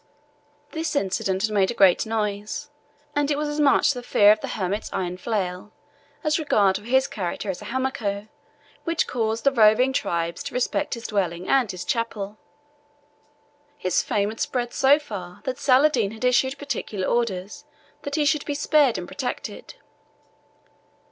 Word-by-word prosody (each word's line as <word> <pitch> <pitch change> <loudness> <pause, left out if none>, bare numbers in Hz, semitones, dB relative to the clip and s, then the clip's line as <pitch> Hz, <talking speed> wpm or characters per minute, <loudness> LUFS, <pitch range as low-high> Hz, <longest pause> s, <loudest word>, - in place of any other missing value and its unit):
This 320 -2 -3
incident 190 -4 0
had 220 - +1
made 195 -2 +2
a 240 - -3
great 195 0 +4
noise, 210 +4 -3 0.4
and 290 0 +1
it 290 - +1
was 300 0 -1
as 295 +1 -3
much 285 0 +4
the 250 - -6
fear 205 -4 +5
of 215 - +2
the - - -4
hermit's 200 +2 -2
iron 180 -1 -2
flail 185 -1 -3 0.5
as 305 +1 +1
regard 205 -11 +3
for 205 - -12
his 265 +2 +3
character 195 0 -3
as 185 - -9
a - - -9
Hamako 225 -4 -2 0.6
which 335 -1 0
caused 225 -2 -2
the 275 - +4
roving 240 +2 +4
tribes 170 -6 -1
to - - -6
respect 230 -4 0
his 235 - -10
dwelling 185 -4 -2
and 265 -5 +3
his 185 -1 -5
chapel. 215 -3 -3 1.4
His 185 -1 +1
fame 205 -1 0
had 225 - -8
spread 245 -2 -2
so 275 +2 +5
far 195 -11 -8
that 260 -1 -4
Saladin 260 -5 +4
had 220 +4 -5
issued 260 +2 +2
particular 235 -9 -3
orders 205 -5 -2 0.4
that 285 0 -4
he 300 - +2
should 295 0 +1
be 290 - -2
spared 290 -3 +3
and 175 - -5
protected. 265 - -5
225 Hz, 165 wpm, -24 LUFS, 200-270 Hz, 1.4 s, fear